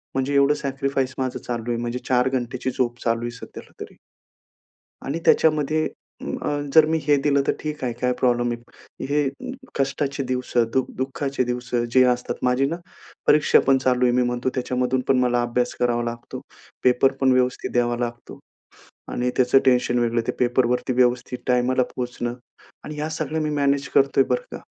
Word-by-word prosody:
म्हणजे 135 +2 0
एवढं 140 +1 +5
सॅक्रिफाईस 135 -1 -1
माझं 130 -1 -2
चालू 120 -1 -4
आहे. 115 - -1
म्हणजे 120 +1 -3
4 125 +1 +3
घंटेची 130 0 -2
झोप 120 -1 -1
चालू 115 0 0
आहे 120 0 -3
सध्याला 120 - -11
तरी. - - -8 1.1
आणि 150 +5 -2
त्याच्यामध्ये 155 0 +3 0.5
अ, - - -2 0.2
जर 160 -1 +7
मी 160 - +2
हे 145 - +5
दिलं 140 -1 +2
तर - - +3
ठीक 150 -3 -5
आहे, 120 -2 -1
काय 125 +1 0
प्रॉब्लेम 120 -1 +2
नाही. 120 0 -10
हे 145 -1 +2 0.5
कष्टाचे 140 0 -1
दिवसं, 125 -2 +1
दु 130 - +3
दुःखाचे 135 0 -2
दिवसं 125 -1 -2
जे 130 0 +6
असतात 125 - -5
माझी 125 +2 +2
ना, 165 - -2 0.5
परीक्षा 150 0 +5
पण 135 -1 +5
चालू 125 -1 +2
आहे 120 - +4
मी 125 - +3
म्हणतो 125 +1 -1
त्याच्यामधून 125 0 0
पण 135 - +3
मला 120 -1 +2
अभ्यास 120 +1 -1
करावा 120 -1 +1
लागतो. 120 0 -6 0.4
पेपर 125 +2 +4
पण 130 -1 +3
व्यवस्थित 125 0 0
द्यावा 120 -1 +1
लागतो. 120 0 -5 0.7
आणि 125 +1 -1
त्याचं 130 +1 +5
टेन्शन 125 -1 +3
वेगळं. 115 0 +1
ते - - +2
पेपरवरती 125 +1 +1
व्यवस्थित 125 0 +1
टायमाला 125 +1 +2
पोहोचणं. 120 -1 -3 0.5
आणि 150 - -7
ह्या 150 +1 -3
सगळ्या 155 0 -3
मी 155 - -1
मॅनेज 140 -1 +1
करतोय 135 0 +4
बरं 125 - 0
का. - - -15
125 Hz, 170 wpm, -23 LUFS, 120-135 Hz, 1.1 s, जर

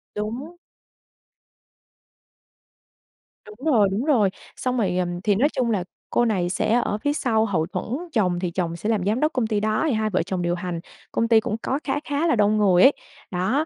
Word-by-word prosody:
Đúng. 245 +11 -5 2.9
Đúng 210 +7 -11
rồi, 215 -6 +5
đúng 205 +5 -1
rồi, 235 -10 +3 0.3
xong 255 0 -2
rồi, 185 -6 0
ừm, 175 -1 -2
thì 205 -2 +3
nói 265 +9 +3
chung 250 -5 -1
là 200 -5 0 0.3
cô 240 - +2
này 190 -6 0
sẽ 200 - 0
ở 205 - -1
phía 290 +7 -1
sau 225 -6 +1
hậu 180 -7 0
thuẫn, - - -4 0.3
chồng 180 -7 +1
thì 180 -1 -2
chồng 170 -1 -2
sẽ 190 +6 -3
làm 210 -5 0
giám 215 +5 +1
đốc 305 +3 +1
công 245 -4 0
ty, 215 -2 0
đó, 215 +3 0
thì - - +1
hai 215 -1 0
vợ 185 -5 0
chồng 185 +1 -3
điều 175 0 0
hành. 175 -1 -4 0.3
Công 230 - 0
ty 225 -1 +6
cũng 215 0 -3
có 270 - -1
khá 270 - -1
khá 290 +3 0
là 320 - +3
đông 210 0 +3
người 190 -4 +4
ấy. 270 - +8 0.4
Đó, 200 - 0
215 Hz, 205 wpm, -23 LUFS, 185-245 Hz, 2.9 s, ấy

